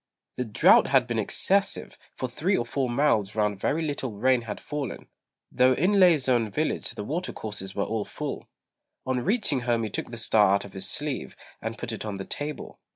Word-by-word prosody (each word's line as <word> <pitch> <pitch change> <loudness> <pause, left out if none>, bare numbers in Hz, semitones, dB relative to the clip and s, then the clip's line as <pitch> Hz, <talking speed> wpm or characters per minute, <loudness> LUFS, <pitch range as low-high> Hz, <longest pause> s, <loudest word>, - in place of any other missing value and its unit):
The 125 - -1
drought 105 - +5
had 135 -2 +4
been 120 -2 -2
excessive; 195 - 0 0.2
for 130 - -3
three 175 +10 0
or 120 - -1
four 130 +1 -1
miles 120 -6 +1
round 105 -2 0
very 160 +10 0
little 140 -6 -3
rain 125 +4 +2
had 110 -3 -6
fallen, 145 -3 -5 0.5
though 130 +1 +4
in 180 +10 +2
Lê's 165 -8 +5
own 120 -4 +2
village 150 +9 -1
the 105 - -5
water 165 - -3
courses 105 -3 -6
were 100 - 0
all 110 0 -2
full. - - -6 0.6
On 130 -1 0
reaching 190 - +1
home 120 -1 0
he 110 - -3
took - - -4
the 120 - -7
star 105 -3 +4
out 100 - -2
of 100 - -12
his 95 0 0
sleeve, 140 - -2 0.3
and 110 +1 -4
put 120 - -4
it 110 - -4
on 105 -2 -4
the 95 - -6
table. 150 +1 -6
120 Hz, 205 wpm, -26 LUFS, 105-145 Hz, 0.6 s, drought